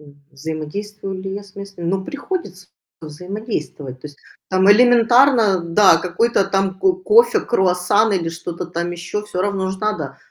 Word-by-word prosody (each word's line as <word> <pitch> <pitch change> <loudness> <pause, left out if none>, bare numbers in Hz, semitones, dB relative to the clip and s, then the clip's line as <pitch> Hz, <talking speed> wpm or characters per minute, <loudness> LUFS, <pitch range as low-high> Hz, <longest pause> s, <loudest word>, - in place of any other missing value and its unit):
М, 150 - -17 0.3
взаимодействую 185 +7 -6
ли 190 0 -5
я 205 - -6
с 195 -1 -19
местными? 200 -3 -8
Ну, 190 +1 -1
приходится 285 - -6 0.3
взаимодействовать. 160 - -6
То 150 - -8
есть 145 - -14 0.3
там 190 +1 +3
элементарно, 240 -2 +5
да, 170 +2 +4
какой-то 185 +6 0
там 195 -1 -1
ко 375 - +3
кофе, 425 +6 +3
круассан 190 +1 +1
или 175 -4 -1
что-то 170 +1 -6
там 170 0 -4
ещё- 175 +4 -5
всё 185 -3 -3
равно 195 -2 -1
ж 190 - -6
надо. 170 -11 -3
190 Hz, 155 wpm, -19 LUFS, 170-210 Hz, 0.3 s, элементарно